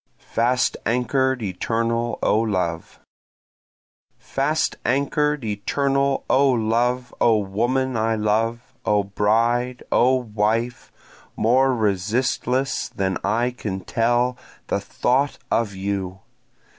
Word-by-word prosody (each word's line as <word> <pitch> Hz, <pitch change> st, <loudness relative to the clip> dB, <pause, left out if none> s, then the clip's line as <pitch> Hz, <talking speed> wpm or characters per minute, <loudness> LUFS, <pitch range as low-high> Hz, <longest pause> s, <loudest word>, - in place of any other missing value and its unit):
Fast 125 Hz, +2 st, +2 dB
Anchor'd 125 Hz, +1 st, +1 dB
Eternal 115 Hz, +4 st, -1 dB
O 105 Hz, -, +3 dB
Love! 90 Hz, -7 st, -2 dB, 1.2 s
Fast 150 Hz, +4 st, -1 dB
anchor'd 140 Hz, +2 st, +1 dB
eternal 135 Hz, +6 st, 0 dB
O 140 Hz, +1 st, +4 dB
love! 125 Hz, +1 st, 0 dB
O 115 Hz, -2 st, +5 dB
woman 120 Hz, +6 st, 0 dB
I 110 Hz, 0 st, +1 dB
love! 115 Hz, +4 st, -1 dB
O 105 Hz, -1 st, +2 dB
bride! 115 Hz, +5 st, +1 dB
O 130 Hz, +2 st, +4 dB
wife! 115 Hz, 0 st, -1 dB, 0.4 s
more 130 Hz, +3 st, +3 dB
resistless 120 Hz, +5 st, 0 dB
than 95 Hz, -1 st, -2 dB
I 120 Hz, +3 st, +1 dB
can 100 Hz, -6 st, -5 dB
tell, 120 Hz, +3 st, +1 dB, 0.3 s
the -, -, +1 dB
thought 135 Hz, +3 st, 0 dB
of 105 Hz, -4 st, 0 dB
you! 95 Hz, -1 st, -3 dB
120 Hz, 100 wpm, -22 LUFS, 105-130 Hz, 1.2 s, O